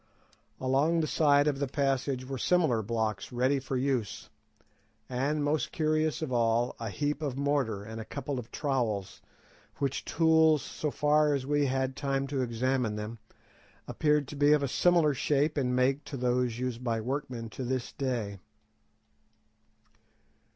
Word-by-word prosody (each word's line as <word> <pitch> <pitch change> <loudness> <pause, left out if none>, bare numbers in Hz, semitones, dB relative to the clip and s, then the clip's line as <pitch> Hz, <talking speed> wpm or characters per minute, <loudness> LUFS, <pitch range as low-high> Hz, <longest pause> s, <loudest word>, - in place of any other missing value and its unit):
Along 140 +6 +2
the 160 - +1
side 145 -2 +3
of 145 -2 0
the 140 - 0
passage 135 -1 -1
were 135 0 -5
similar 160 -11 +2
blocks 110 -2 -2
ready 130 +3 +1
for 130 0 -3
use, 125 -5 -2 0.8
and, 140 +4 -1
most 145 -2 0
curious 155 0 0
of 135 -5 -3
all, 115 0 +1
a 115 -1 -4
heap 145 +6 -2
of 140 -4 -3
mortar 140 -8 0
and 110 +1 -7
a - - -8
couple 140 0 -4
of 120 - -9
trowels, 120 - -2 0.5
which 140 -1 -2
tools, 160 -2 +4
so 150 - -3
far 150 0 +3
as 135 -2 -3
we 145 0 +1
had 130 0 -1
time 135 -1 -1
to 135 -2 -1
examine 125 -1 0
them, 105 +2 -6 0.7
appeared 150 -2 +1
to - - -7
be 145 +1 +4
of 150 -2 +2
a - - +1
similar 165 +1 +3
shape 145 +3 +1
and 125 -4 0
make 135 +3 +2
to 140 - -6
those 125 -1 0
used 125 -1 -3
by 115 -2 0
workmen 125 -1 -4
to 130 - -6
this 125 0 -2
day. 115 -7 -3
135 Hz, 160 wpm, -29 LUFS, 120-145 Hz, 0.8 s, tools